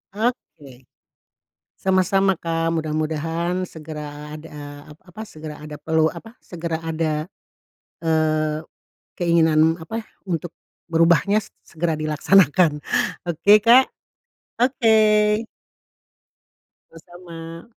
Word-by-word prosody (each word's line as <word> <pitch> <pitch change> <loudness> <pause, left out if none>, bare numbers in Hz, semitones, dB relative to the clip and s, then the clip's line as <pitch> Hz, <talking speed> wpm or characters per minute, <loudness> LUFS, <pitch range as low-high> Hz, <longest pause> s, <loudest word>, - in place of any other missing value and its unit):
Oke. 150 - -4 1.0
Sama-sama 190 0 +2
Kak, 165 0 -1
mudah-mudahan 165 +3 -2
segera 150 -1 -8
ada 145 -2 -10
ap 150 - -13
apa, 210 +4 -10
segera 155 -1 -9
ada 150 0 -8
pelu 160 +1 +1
apa, 225 +7 -8
segera 165 -2 -5
ada, 160 -1 -2 0.7
eee 155 -1 0 0.5
keinginan 165 -1 +3
apa, 220 +7 -5 0.2
untuk 170 0 -3 0.4
berubahnya 170 +6 +4 0.2
segera 165 -1 -2
dilaksanakan 155 0 +3 0.5
oke 175 +4 +2
Kak? 250 +3 +7 0.7
Oke. 220 -3 +3 1.5
Sama-sama. 165 +2 -11
165 Hz, 85 wpm, -22 LUFS, 155-185 Hz, 1.5 s, Kak